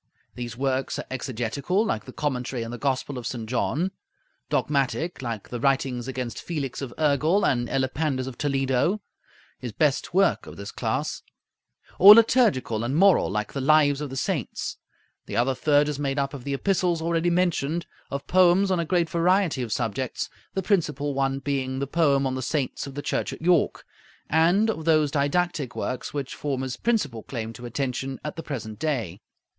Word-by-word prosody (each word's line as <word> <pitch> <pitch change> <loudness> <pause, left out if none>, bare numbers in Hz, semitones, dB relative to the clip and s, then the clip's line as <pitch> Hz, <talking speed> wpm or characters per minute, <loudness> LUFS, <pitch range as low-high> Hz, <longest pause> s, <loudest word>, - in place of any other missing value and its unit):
These 120 -2 -6
works 135 0 -1
are - - -5
exegetical, 130 - -1
like 110 - -2
the 130 - -9
'Commentary 125 -4 -2
on 115 - -6
the 120 - -6
Gospel 135 -1 -1
of 120 - -5
St. 115 -3 -5
John'; 145 +9 0 0.6
dogmatic, 150 +3 0
like 115 -5 -5
the 120 - -4
'Writings 130 -2 0
against 125 -3 -4
Felix 145 -7 -4
of 135 -3 -5
Urgel 155 +6 +2
and 120 -2 +1
Elipandus 135 0 -1
of 130 -2 -6
Toledo,' 135 - +1 0.6
his - - -5
best - - +1
work - - +2
of - - -10
this - - -7
class; - - -2 0.8
or 205 +2 +12
liturgical 215 - +3
and 125 +4 -1
moral, 195 +3 +5
like 105 +1 -3
the 140 - -2
'Lives 145 0 +4
of 150 - -4
the 135 - -7
Saints,' 155 - -2 0.5
The - - -3
other 125 +3 +2
third 145 +2 +3
is 145 -1 -3
made 140 -1 -1
up 140 0 -1
of 135 -4 -8
the 140 -1 -1
epistles, 180 +1 +1
already 170 +1 +1
mentioned; 170 -2 0 0.2
of 140 0 -4
poems 185 +2 +4
on 185 - +2
a 170 - 0
great 170 0 +1
variety 170 -2 +2
of 120 -3 -4
subjects, 120 +2 -2 0.2
the 190 - -1
principal 150 -7 0
one 135 0 0
being 135 -1 -2
the 140 - -1
'Poem 140 -2 +2
on 130 - 0
the 130 - -3
Saints 140 0 -2
of 140 - -9
the 145 - -4
Church - - -1
at - - -10
York'; 175 -2 +2 0.5
and 170 +7 +4
of 160 -7 -6
those 155 -3 +3
didactic 145 -2 0
works 125 -1 -3
which 140 -3 -4
form 135 -3 -3
his 130 -2 -3
principal 150 - 0
claim 115 -2 -5
to 120 +2 -8
attention 130 +1 -3
at 150 - -4
the 165 - -5
present 115 -9 -6
day. 115 - -2
140 Hz, 185 wpm, -25 LUFS, 130-165 Hz, 0.8 s, or